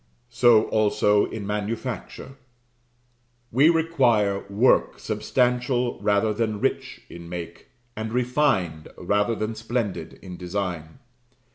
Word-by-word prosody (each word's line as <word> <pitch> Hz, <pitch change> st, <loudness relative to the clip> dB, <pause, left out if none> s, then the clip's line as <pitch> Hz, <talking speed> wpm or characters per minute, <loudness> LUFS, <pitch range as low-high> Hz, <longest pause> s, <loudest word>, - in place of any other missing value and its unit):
So 120 Hz, -2 st, +5 dB
also, 105 Hz, -1 st, +2 dB
in 110 Hz, -3 st, -6 dB
manufacture: 110 Hz, +6 st, -4 dB, 1.2 s
we 140 Hz, +7 st, +5 dB
require 125 Hz, -12 st, +2 dB
work 110 Hz, +6 st, +3 dB
substantial 125 Hz, 0 st, 0 dB
rather 105 Hz, +1 st, +1 dB
than 110 Hz, -1 st, -2 dB
rich -, -, -2 dB
in 85 Hz, 0 st, -11 dB
make; 85 Hz, -1 st, -7 dB, 0.3 s
and 110 Hz, 0 st, -4 dB
refined, 120 Hz, -, 0 dB
rather 105 Hz, +5 st, 0 dB
than 110 Hz, +1 st, -3 dB
splendid 115 Hz, -2 st, -3 dB
in 90 Hz, -2 st, -8 dB
design. 90 Hz, -3 st, -4 dB
110 Hz, 105 wpm, -24 LUFS, 100-120 Hz, 1.2 s, So